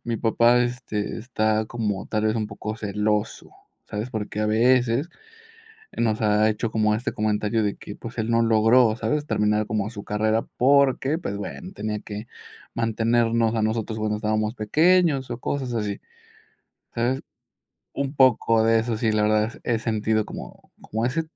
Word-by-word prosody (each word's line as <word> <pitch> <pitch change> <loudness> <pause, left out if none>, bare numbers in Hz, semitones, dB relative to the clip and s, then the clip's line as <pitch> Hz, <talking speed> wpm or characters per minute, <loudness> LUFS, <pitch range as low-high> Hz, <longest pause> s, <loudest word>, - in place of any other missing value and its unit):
Mi 120 -1 -2
papá, 115 +2 +3
este, 120 -4 -3
está 110 -2 0
como 105 -5 -3
tal 110 0 -1
vez, 110 0 +2
un 110 -2 -2
poco 105 +1 -6
celoso, 105 - -2 0.3
¿sabes?, 110 +3 -5
porque 105 -2 -4
a 105 - +1
veces 120 +5 +2 0.9
nos 110 -2 0
ha 105 0 +3
hecho 110 +1 -2
como 110 -1 +2
este 110 +3 -2
comentario 105 +1 0
de 100 -1 -1
que, 100 - -9
pues, 115 +1 -9
él 110 +1 -1
no 115 0 +3
logró, 115 +1 +4
¿sabes?, 130 +7 -1
terminar 105 -2 +1
como 105 -1 -1
su 105 -3 -9
carrera 110 +2 0 0.2
porque, 140 +2 +3
pues, 130 - -4
bueno, 185 - -7
tenía 105 - -4
que 105 +1 -7 0.5
mantenernos 115 0 +1
a 110 - 0
nosotros 110 0 -1
cuando 105 0 -1
estábamos 110 +1 -1
pequeños 150 - +2
o 120 - -4
cosas 135 -3 -3
así, 105 -3 -2 1.0
¿sabes?, 125 +3 0 0.7
un 140 0 -3
poco 115 -4 +4
de 115 0 +4
eso, 115 -1 -2
sí, 110 -2 +1
la 105 - +2
verdad, 110 +2 +2
he 115 -2 0
sentido 110 -1 0
como - - -10
como 110 +2 -2
ese 155 +6 0
110 Hz, 165 wpm, -24 LUFS, 105-120 Hz, 1.0 s, logró